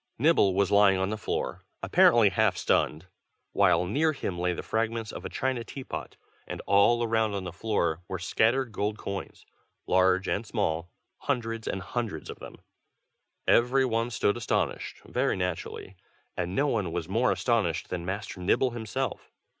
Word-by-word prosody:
Nibble 120 - +4
was 100 0 +2
lying 100 -1 +5
on 95 +2 -1
the - - -1
floor, 105 - -3 0.2
apparently 115 -4 +5
half 95 -1 +2
stunned, 80 +3 +1 0.5
while 90 -3 +3
near 155 - +1
him 90 -10 -4
lay 90 +1 +1
the 85 - -4
fragments 115 -1 -2
of - - -8
a - - -3
china 130 -3 -1
teapot; 130 +3 -7 0.3
and - - -5
all 100 +5 +4
around 110 -2 +1
on 100 - -3
the 90 - -5
floor, 85 -5 -1
were 95 - -3
scattered 115 +7 +1
gold 105 +1 -2
coins, 100 -2 -6 0.4
large 95 +1 +3
and 105 - 0
small, 80 0 -1 0.3
hundreds 115 -4 -2
and 95 - -3
hundreds 110 -7 -4
of - - -11
them. - - -10 0.9
Every 125 +3 +4
one 115 -1 0
stood 110 -2 +1
astonished, 115 - -2
very - - 0
naturally, 90 +1 -4 0.4
and 90 +2 -3
no 140 - +2
one 105 - 0
was 80 -1 -3
more 115 +7 +2
astonished 110 -10 0
than 90 -2 -3
Master 95 +2 -5
Nibble 120 +8 +2
himself. 120 +3 -4
105 Hz, 160 wpm, -28 LUFS, 95-115 Hz, 0.9 s, lying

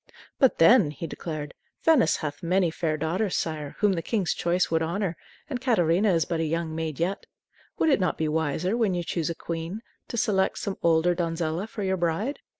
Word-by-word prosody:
"But 265 -3 +4
then," 185 - +6
he 150 +3 -6
declared, 155 -3 -6 0.3
"Venice 315 -7 +4
hath 145 -2 -5
many 175 0 +2
fair 160 -2 -1
daughters, 180 +6 -1
sire, 155 -3 -3
whom 205 -2 +3
the 170 - -2
king's 195 -2 0
choice 175 +1 0
would 165 0 +2
honor, 175 +2 -1 0.3
and 255 -4 -4
Catarina 195 -5 +3
is 165 -2 +2
but 165 - -2
a - - +1
young 165 0 -2
maid 160 -3 -4
yet. 185 +4 -2 0.5
Would 320 - +2
it 275 - +4
not 180 - 0
be 160 - 0
wiser, 160 +5 0
when 220 -6 +1
you 175 - -1
choose 170 -1 -2
a 170 - -3
queen, 170 +7 -5 0.2
to 235 - -5
select 190 -3 +1
some 200 - -4
older 170 +1 +3
donzella 170 +1 -2
for 215 -2 -6
your 190 0 0
bride? 175 - -1
170 Hz, 200 wpm, -26 LUFS, 160-200 Hz, 0.5 s, then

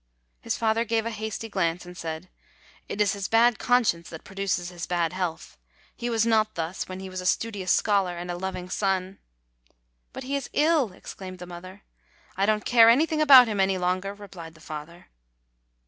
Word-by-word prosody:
His - - -3
father 225 0 +1
gave 225 -1 -1
a 230 - -2
hasty 220 +1 -5
glance, 180 -4 -1
and 180 0 -11
said: 165 0 -6 0.3
:< - - -28
It - - -5
is 205 -1 +3
his 200 -1 -4
bad 230 +1 +4
conscience 230 -10 +2
that 160 - -9
produces 195 -3 -2
his 175 -1 -7
bad 170 -1 0
health. 180 -3 -4 0.4
He 240 0 -4
was 225 -1 +1
not 215 -1 +2
thus 165 +3 -4
when 185 0 -6
he 190 - -7
was 185 0 -6
a - - -8
studious 200 -3 0
scholar 195 -4 +2
and 175 +1 -5
a - - -3
loving 185 0 -5
son.' 190 0 -1 0.9
"But - - -7
he 275 +2 -3
is 280 -2 -3
ill!" 300 - +3
exclaimed 185 0 -9
the 180 - -8
mother. 185 +3 -11 0.5
"I 195 +1 +1
don't 215 -1 +1
care 230 -2 +7
anything 310 +6 +3
about 270 -5 +9
him 210 -2 -2
any 190 0 +2
longer!" 185 +2 -1
re 205 0 -11
plied 165 -4 -11
the - - -17
father. 155 +2 -9
195 Hz, 195 wpm, -26 LUFS, 180-225 Hz, 0.9 s, about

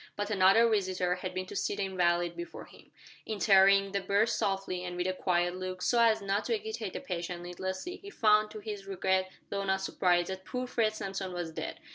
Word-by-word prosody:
But 205 +1 -3
another 195 +3 +5
visitor 185 -4 +1
had 185 0 -5
been 185 0 -2
to - - -9
see - - -1
the 200 - -2
invalid 175 -2 +1
before 170 0 -7
him. - - -18 0.4
Entering 195 -2 +5
the 200 0 -1
berth 205 +4 +2
softly, 195 -4 -1
and 180 -1 -5
with 180 - -1
a 185 - 0
quiet 175 -1 0
look, 185 0 -5
so 240 - +2
as 220 -2 +4
not 200 +2 0
to 460 - +1
agitate 440 +1 -5
the - - -4
patient 175 -7 -5
needlessly, 190 - -5
he 400 - -11
found 215 - +3
to 215 - -8
his 205 -2 -6
regret, 190 -1 0 0.2
though 200 0 -2
not 190 0 0
surprise, 175 -2 +2
that 190 0 -5
poor 250 +5 -4
Fred 225 -3 0
Samson 195 -2 -4
was 175 -2 -4
dead. - - -5
190 Hz, 210 wpm, -30 LUFS, 180-210 Hz, 0.4 s, another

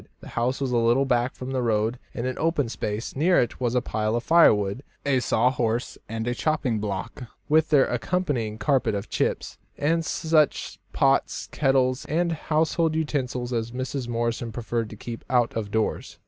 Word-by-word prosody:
The - - -11
house 120 +3 -1
was 135 -2 -1
a 120 - +2
little 120 +4 +3
back 125 -1 +1
from 130 +1 -6
the 130 -1 0
road 115 +1 0 0.2
in 120 -2 -3
an 130 - -3
open 155 -6 +1
space; 105 -1 -4
near 175 +6 +4
it 120 - -1
was 120 -1 0
a 125 - +2
pile 110 -1 -1
of 120 - -1
firewood, 105 -10 +4 0.2
a 135 -2 +3
saw 125 0 +2
horse 120 -1 -1
and 110 0 -3
chopping 140 -6 0
block, 100 +4 -4 0.2
with 155 +1 +3
their 145 -4 +5
accompanying 120 -5 -1
carpet 110 0 +1
of 100 - -5
chips, - - -1 0.2
and 165 +3 +1
such 160 -2 +1
pots, - - +1
kettles, 135 -2 +1
and 170 +3 0
household 160 +1 0
utensils 130 -5 -2
as 115 -1 -1
Mrs. 130 +1 -4
Morrison 115 0 -2
preferred 115 0 -3
to - - -9
keep 115 +2 -7
out 120 -2 +2
of 110 -3 -3
doors. 110 +1 -2
125 Hz, 175 wpm, -25 LUFS, 115-145 Hz, 0.2 s, their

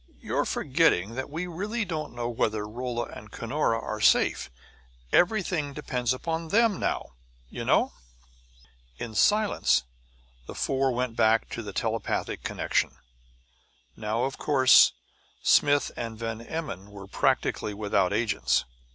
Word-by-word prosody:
You're - - -1
forgetting 95 +6 +1
that 130 +3 -4
we 160 +4 -4
don't 175 - -8
really 210 +5 -2
know 155 -9 -4
whether 110 -3 -1
Rolla 120 +1 -3
and 105 - -10
Cunora 115 -1 -1
are 110 -1 -5
safe. - - +3 0.6
Everything 175 -7 +2
depends 125 -4 -2
upon 165 +5 -2
them 220 +2 +3
now, - - -2 0.4
you - - -6
know." - - +2 1.0
In 115 -2 -6
silence 210 - +3 0.6
the - - -8
four 135 0 +1
went 125 -1 -2
back 110 0 +2
into 110 -3 -6
telepathic 110 +2 -2
connection. - - -1 1.0
Now, 110 +3 -2
of 135 - -3
course, 130 -3 +6 0.5
Smith 145 0 +4
and 115 -1 -5
Van 115 0 -4
Emmon 115 - -6
were 100 -1 -10
practically 100 +1 0
without 100 -3 +1
agents. 105 0 +1
120 Hz, 125 wpm, -27 LUFS, 110-150 Hz, 1.0 s, course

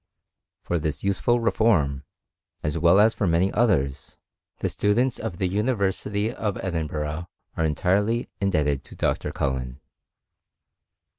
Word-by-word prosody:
For 85 - -1
this 75 -3 -3
useful 100 +5 +2
reform, 85 - +2 0.6
as 75 0 -1
well 85 +4 +5
as 110 +2 +5
for 100 - -1
many 85 +3 +2
others, 70 - 0 0.4
the - - -1
stu 105 0 +1
dents 125 +1 +1
in 110 - -3
the 90 +2 -1
University 105 +1 0
of 105 -5 -2
Edinburgh 80 -2 -3 0.3
are 80 - 0
entirely 100 +9 +1
in 100 -2 +1
debted'to 75 -5 -1
Dr. - - -1
CuUen. 65 -1 -3
90 Hz, 130 wpm, -25 LUFS, 75-105 Hz, 0.6 s, well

